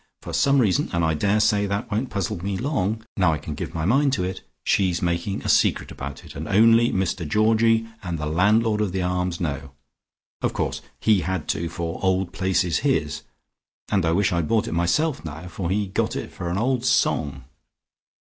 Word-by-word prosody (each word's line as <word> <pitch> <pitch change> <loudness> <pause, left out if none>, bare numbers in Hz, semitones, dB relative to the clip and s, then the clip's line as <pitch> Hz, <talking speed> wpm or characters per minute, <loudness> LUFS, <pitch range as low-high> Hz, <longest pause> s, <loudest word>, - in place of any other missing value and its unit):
For - - -7
some 140 0 +3
reason, 105 -9 +2
and 85 -1 +1
I 80 - +2
daresay 105 +4 +2
that 100 +3 -3
won't 115 +5 -1
puzzle 95 -3 -3
me 100 -1 -2
long, 110 -5 -1
now 90 -4 +3
I - - -1
can - - -6
give - - -6
my 80 -1 -1
mind 135 +7 +3
to 95 -8 0
it, 95 +1 -4 0.2
she's 90 -4 +2
making 85 +3 -2
a - - -4
secret - - +2
about 70 +1 -7
it, - - -11
and - - -5
only 115 +3 +5
Mr 95 -3 -1
Georgie 115 +4 +3
and 85 -3 -4
the 75 - -3
landlord 105 +7 +2
of 100 -4 -1
the 95 -1 -1
Arms 90 -1 -1
know. 70 -4 -4 0.7
Of - - 0
course - - -2 0.2
he 110 -3 +3
had 95 -3 -3
to, 85 0 -1
for 85 0 -4
'Old 95 -1 0
Place' 95 0 +1
is 85 -3 0
his, 80 - 0 0.7
and 95 -3 +2
I 80 - +2
wish 100 +2 +2
I 85 - 0
had 85 -3 0
bought 110 -2 +1
it - - -4
myself 85 - +1
now, 80 +2 -7
for 90 0 -4
he 100 +2 +1
got 95 - -1
it - - -5
for 85 - -5
an 90 - -1
old 125 +2 0
song." 75 - +1
95 Hz, 205 wpm, -23 LUFS, 85-110 Hz, 0.7 s, only